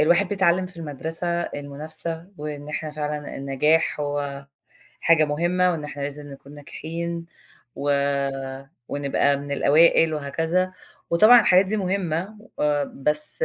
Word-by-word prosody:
الواحد 175 +5 +4
بيتعلَّم 185 -2 +2
في 180 0 -14
المدرسة 165 +3 -3
المنافسة، 155 +4 -5
وإن 150 -1 -6
إحنا 155 0 -4
فعلًا 150 -1 -4
النجاح 150 +4 +1
هو 145 -1 -3 0.5
حاجة 165 -2 +5
مهمة، 175 +5 +1
وإن 160 -4 -3
إحنا 145 -1 -6
لازم 145 +1 -6
نكون 140 +1 -13
ناجحين، 165 +3 -6 0.5
و 145 - -2 1.0
ونبقى 140 0 +1
من 140 0 -6
الأوائل 160 +3 +4
وهكذا. 165 +6 -1 0.4
وطبعًا 215 +8 +8
الحاجات 185 -2 +5
دي 205 +3 -1
مهمة، 190 0 -2 0.2
آآ، 145 -1 +2
بس 150 - -1
155 Hz, 125 wpm, -24 LUFS, 145-170 Hz, 1.0 s, وطبعًا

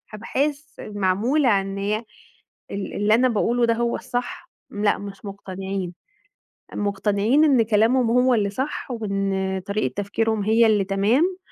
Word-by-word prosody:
أبحاث 280 +7 -2 0.2
معمولة 210 +8 +1
عن 195 -2 +2
إن 195 - -5
هي 210 +3 -1 0.7
ال 200 -1 -5
اللي 210 +1 +3
أنا 255 +2 +3
باقوله 235 +2 +1
ده 230 - +2
هو 235 0 0
الصح، 245 -1 -5 0.2
لأ 205 0 +1
مش 200 0 -9
مقتنعين. 195 -2 -5 0.8
مقتنعين 205 +7 +1
إن 270 -6 +4
كلامهم 225 +3 +2
هو 250 +1 +4
اللي 205 -4 +1
صح 265 +3 -4
وإن 195 -3 -2
طريقة 205 +2 -1
تفكيرهم 210 +1 -1
هي 225 +2 +4
اللي 210 -2 +3
تمام، 235 - +1
215 Hz, 140 wpm, -23 LUFS, 200-245 Hz, 0.8 s, إن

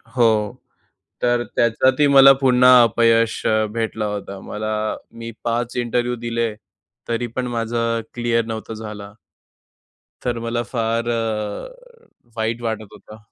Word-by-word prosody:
हो, 110 -4 +2 0.7
तर 120 0 +2
त्याच्यातही 130 +5 +3
मला 135 -1 +8
पुन्हा 125 -1 +6
अपयश 115 0 +2
अ, 110 0 +2
भेटला 110 -1 -2
होता. 100 -1 -5
मला 110 +2 -4 0.5
मी 115 0 -6
5 120 +1 -2
इंटरव्ह्यू 120 0 -1
दिले, 115 -1 -1 0.5
तरी 120 +1 -1
पण 130 -1 -1
माझं 115 -1 -1
क्लिअर 120 -1 0
नव्हता 110 0 -5
झाला. 105 -2 -8 1.1
तर 120 -1 -1
मला 115 +1 -2
फार 115 -1 -2
अ, 120 - -5 0.3
वाईट 115 +2 -2
वाटत 110 -3 -4
होतं. 105 +1 -13
115 Hz, 120 wpm, -21 LUFS, 110-120 Hz, 1.1 s, मला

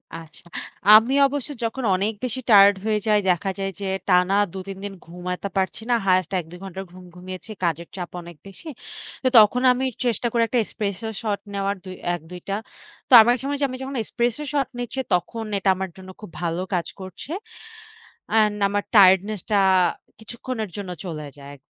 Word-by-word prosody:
আচ্ছা। 165 0 -12 0.5
আমি 225 +5 +7
অবশ্য 285 0 -4
যখন 230 +3 -3
অনেক 200 +4 0
বেশি 255 0 -2
টায়ারড 200 -2 +8
হয়ে 215 -1 +1
যাই 210 -1 +4
দেখা 180 +2 +1
যায় 195 0 -2
যে, 200 - -4 0.2
টানা 180 +1 +4 0.2
২ - - -6
৩ 195 -1 -6
দিন 205 -1 -5
ঘুমাইতে 180 +3 -5
পারছি 190 +3 -1
না। - - +4
হাইয়েস্ট 185 -2 +2
১ 175 - -6
২ 180 - -10
ঘন্টা 190 0 -6
ঘুম 185 0 -13
ঘুমিয়েছি। 185 +4 -9
কাজের 170 0 -1
চাপ 180 -2 -5
অনেক 170 -1 -11
বেশি। 195 - -12 0.6
তো - - +2
তখন 220 +3 +6
আমি 255 +1 0 0.2
চেষ্টা 240 0 0
করি 235 - +1
১ - - -11
টা - - +5
Espresso 200 +1 -4
Shot 210 -3 -1
নেওয়ার 200 0 -1
দু 190 - -9 0.3
১ 175 - -9
২ 180 0 -8
টা। 195 - 0 0.5
তো - - +1
আমার 240 +2 +4
সময়, 285 +1 -2
আমি 255 - -6
যখন 270 +1 -5
Espresso 240 +5 -2
Shot 280 -3 0
নিচ্ছি 245 +2 -4
তখন 180 +6 -1
এটা 195 0 +1
আমার 190 0 -4
জন্য 190 0 -11
খুব 210 - -9
ভালো 170 0 -1
কাজ 175 -2 0
করছে। 190 - -9 1.0
অ্যান্ড 215 -2 +3
আমার 205 0 -1
টায়ার্ডনেসটা 200 +1 +4 0.6
কিছুক্ষণের 230 -1 -5
জন্য 200 -2 -5 0.2
চলে 155 -4 -5
যায়। 140 0 -11
200 Hz, 180 wpm, -23 LUFS, 180-225 Hz, 1.0 s, টায়ারড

